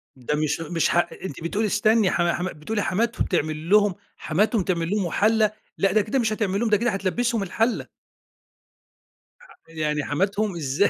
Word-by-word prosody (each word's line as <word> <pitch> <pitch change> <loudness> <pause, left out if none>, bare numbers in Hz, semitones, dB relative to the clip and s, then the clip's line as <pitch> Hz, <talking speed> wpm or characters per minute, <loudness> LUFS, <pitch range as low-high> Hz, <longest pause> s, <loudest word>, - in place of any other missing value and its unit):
ده 130 +3 -2
مش 150 0 0
مش 165 +1 0
ح - - +1 0.3
أنتِ 165 -3 -6
بتقولي 210 +6 0
استني 215 0 +3
حم 175 -1 +1
حم 175 +1 -1
بتقولي 210 +8 -3
حماتهم 230 +5 0
تعمل 155 -1 -2
لهم 205 -3 +4 0.2
حماتهم 200 +5 +1
تعمل 170 -2 -1
لهم 205 -2 0
وحلّة. 215 +4 +2 0.3
لأ، 195 -1 +2
ده 215 +1 +4
كده 220 +6 -1
مش 220 -2 +1
هتعمل 200 -2 -1
لهم، 235 -1 0
ده 210 - +4
كده 235 +1 0
هتلبّسهم 210 +3 -1
الحلّة. 225 +5 -1 1.5
ح - - -18
يعني 150 -2 -2
حماتهم، 195 +5 -1
إزاي! 150 +5 +1
195 Hz, 170 wpm, -24 LUFS, 165-215 Hz, 1.5 s, لهم